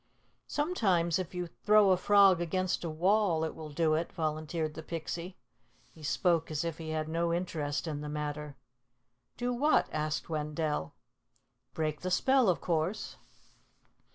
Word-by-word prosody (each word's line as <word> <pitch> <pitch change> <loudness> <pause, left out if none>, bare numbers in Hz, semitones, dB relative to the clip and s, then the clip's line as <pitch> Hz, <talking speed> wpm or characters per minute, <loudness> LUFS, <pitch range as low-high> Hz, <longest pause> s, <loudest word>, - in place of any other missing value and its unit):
"Sometimes 190 - +1
if 185 -1 -5
you 180 0 -2
throw 210 +3 +4
a - - +6
frog 195 -1 +5
against 185 +2 -1
a 170 - -2
wall 175 +1 +2
it 160 - -2
will 155 -1 -8
do 155 +1 +1
it," 165 +2 -1
volunteered 155 -1 -2
the 160 - -7
Pixie. 170 +3 -5 0.6
He 160 - -16
spoke 165 +2 +1
as 155 +1 -2
if 165 -1 -4
he 160 -1 -6
had 155 0 -2
no 170 +1 0
interest 160 -4 -2
in 150 -3 -4
the 150 - -5
matter. 150 -1 -4 0.8
"Do 245 0 -1
what?" 290 +6 +3
asked 155 0 -2
Wendell. 150 - -2 0.8
"Break 155 -1 -2
the 185 - -2
spell, 260 +4 +3
of 180 - +1
course." 170 +4 -1
165 Hz, 155 wpm, -31 LUFS, 155-185 Hz, 0.8 s, a